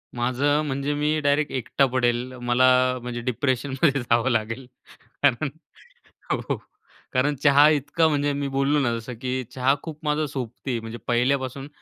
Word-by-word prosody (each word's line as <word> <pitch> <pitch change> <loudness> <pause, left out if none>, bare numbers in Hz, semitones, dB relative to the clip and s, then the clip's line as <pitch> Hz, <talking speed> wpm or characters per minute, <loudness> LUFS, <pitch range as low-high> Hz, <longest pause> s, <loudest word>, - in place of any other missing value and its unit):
माझं 130 +5 +1
म्हणजे 140 +1 -2
मी 150 +1 0
डायरेक्ट 145 +1 +1
एकटा 130 +2 +1
पडेल 125 0 +1
मला 120 +1 +3 0.3
म्हणजे 120 -1 -5
डिप्रेशनमध्ये 130 +3 0
जावं 120 +2 +2
लागेल. 115 +3 -2 0.6
कारण 140 +1 +3 0.8
हो. - - -1 0.6
कारण 140 +3 +2
चहा 145 0 +7
इतका 150 +2 +2
म्हणजे 145 -1 +1
मी 140 0 -2
बोललो 140 +2 +1
ना 125 -4 +1
जसं, 115 +2 -7
की 130 0 -2
चहा 130 +1 +2
खूप 155 -2 -7
माझा 150 +1 +1
सोबती 125 -1 -4
म्हणजे 115 +1 -7
पहिल्यापासून 130 +2 0
135 Hz, 140 wpm, -24 LUFS, 120-145 Hz, 0.8 s, चहा